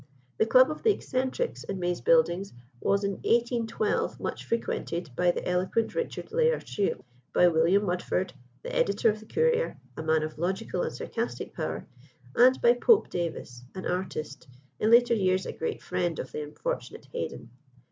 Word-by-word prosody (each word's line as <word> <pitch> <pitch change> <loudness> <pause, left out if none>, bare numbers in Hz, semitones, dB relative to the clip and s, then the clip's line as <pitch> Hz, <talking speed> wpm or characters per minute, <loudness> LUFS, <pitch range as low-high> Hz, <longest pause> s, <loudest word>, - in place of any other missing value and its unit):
The 220 - +3
club 255 +5 +6
of 305 - -6
"The 455 - +3
Eccentrics," 260 - -2
in 195 -1 -4
May's 175 0 -1
Buildings, 425 - +3 0.3
was, 200 +7 +1
in 200 -1 -1
1812, 235 - 0
much - - -4
frequented 175 - -2
by 180 0 +3
the 175 - -1
eloquent 185 +5 0
Richard 480 -1 -4
Lalor 480 +1 +2
Sheil, 200 -7 -2 0.3
by 180 - +6
William 170 +5 +3
Mudford, 180 0 -1 0.3
the - - -5
editor 205 +3 +3
of 215 - -7
the 220 - -15
Courier, 475 - +1 0.2
a - - -5
man 160 0 +2
of 155 0 -6
logical 185 +3 -1
and - - -1
sarcastic - - -4
power, - - -4 0.5
and 255 +2 +6
by 240 0 +7
"Pope 420 - +4
Davis," 160 -8 -4
an 185 - -6
artist, 165 -4 -4 0.3
in 215 - +2
later 235 +1 +6
years 185 -3 +1
a - - -4
great 160 - -4
friend 175 -3 -1
of 130 - -5
the - - -4
unfortunate 150 0 -5
Haydon. 120 - -5
195 Hz, 165 wpm, -28 LUFS, 175-245 Hz, 0.5 s, by